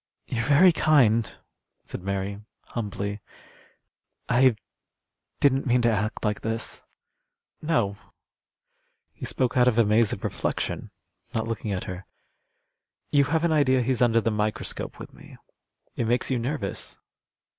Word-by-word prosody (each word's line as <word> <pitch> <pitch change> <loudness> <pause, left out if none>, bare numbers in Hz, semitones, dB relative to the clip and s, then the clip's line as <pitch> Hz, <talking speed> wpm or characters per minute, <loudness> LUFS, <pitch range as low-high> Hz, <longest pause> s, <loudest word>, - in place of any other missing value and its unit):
"You're 120 -1 -2
very 150 +6 +7
kind," 125 -9 +3 0.5
said - - -7
Mary, 100 +1 -3 0.3
humbly. 105 -2 -4 1.1
"I 130 -1 +4 0.8
didn't 135 -1 +3
mean 120 0 +3
to 120 - +4
act 105 +1 -2
like 105 -1 -1
this." 115 0 -3 0.8
"No," 120 -11 0 1.2
he - - -7
spoke 130 -2 -1
out 125 -1 +5
of 120 -2 +3
a 115 - +5
maze 105 +1 +3
of - - -5
reflection, - - -3 0.5
not 110 0 -1
looking 110 -2 -3
at 95 -2 -2
her. 95 0 -7 1.0
"You 140 -1 +4
have 160 +3 0
an 170 - +2
idea 130 -4 +3
he's 125 0 0
under 115 -2 +4
the 115 - 0
microscope 105 0 -3
with - - -10
me. - - -14 0.6
It 115 - -1
makes 120 +3 0
you 125 - +1
nervous." 120 -4 -3
115 Hz, 135 wpm, -26 LUFS, 105-130 Hz, 1.2 s, very